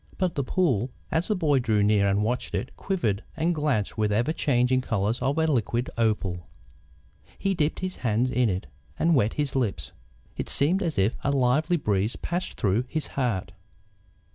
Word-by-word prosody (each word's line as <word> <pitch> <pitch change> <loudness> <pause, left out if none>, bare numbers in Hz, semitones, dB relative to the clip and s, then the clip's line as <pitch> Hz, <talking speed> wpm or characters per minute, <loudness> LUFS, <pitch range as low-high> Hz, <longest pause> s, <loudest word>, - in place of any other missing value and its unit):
But 185 -3 0
the 140 - -1
pool, 130 - +1 0.2
as 160 +2 0
the 215 - +1
boy 150 -7 +2
drew 110 -4 +2
near 100 -1 +3
and 100 +1 +2
watched 125 +4 -2
it, 125 - -4
quivered 115 - -1
and 165 +2 +1
glanced 140 - -1
with 105 -1 +2
the 105 - +1
ever 120 +8 +1
changing 130 -4 +2
colours 110 -1 -1
of 135 +4 0
a 160 - +3
liquid 120 -4 0
opal. 100 -6 -1 0.9
He 195 0 0
dipped 155 -3 -1
his 185 0 -3
hands 120 +1 0
in 125 -2 +2
it 95 +1 -2 0.3
and 170 +1 +3
wet 115 -7 +2
his 145 -2 -2
lips. 105 - -1 0.5
It - - -4
seemed 170 +8 +3
as 165 - -2
if 100 +4 +2
a - - +1
lively 140 +6 +2
breeze 105 - 0
passed 175 +2 -3
through 110 +2 +1
his 155 +3 -3
heart. 115 -9 -1
125 Hz, 185 wpm, -26 LUFS, 105-155 Hz, 0.9 s, near